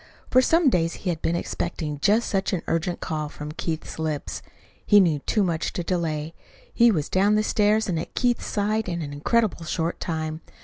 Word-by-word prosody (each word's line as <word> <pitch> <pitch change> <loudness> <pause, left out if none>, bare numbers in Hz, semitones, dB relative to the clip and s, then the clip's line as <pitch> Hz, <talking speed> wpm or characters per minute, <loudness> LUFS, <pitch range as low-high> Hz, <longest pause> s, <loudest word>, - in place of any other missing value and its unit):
For 255 - +6
some 325 +1 +4
days 165 -3 +1
he 180 - +2
had 160 - -5
been 165 - 0
expecting 160 -4 -3
just 210 +8 +3
such 195 -2 0
an 180 - -1
urgent 170 +2 -1
call 155 -2 -3
from 150 0 -7
Keith's 160 0 -5
lips. 155 -2 -3 0.4
He 205 - +6
knew 165 -6 +3
too 210 +8 0
much 170 -3 -1
to 175 - -3
delay. 165 -3 -2 0.4
He 235 0 +5
was 160 -9 0
down 200 +3 +3
the 215 - +2
stairs 215 +1 +2
and 170 -4 -1
at 165 - -7
Keith's 245 -1 +1
side 210 0 0
in 170 -2 -3
an 145 -1 -6
incredibly 180 +2 0
short 165 +1 -2
time. 155 -2 -3
170 Hz, 195 wpm, -24 LUFS, 160-210 Hz, 0.4 s, For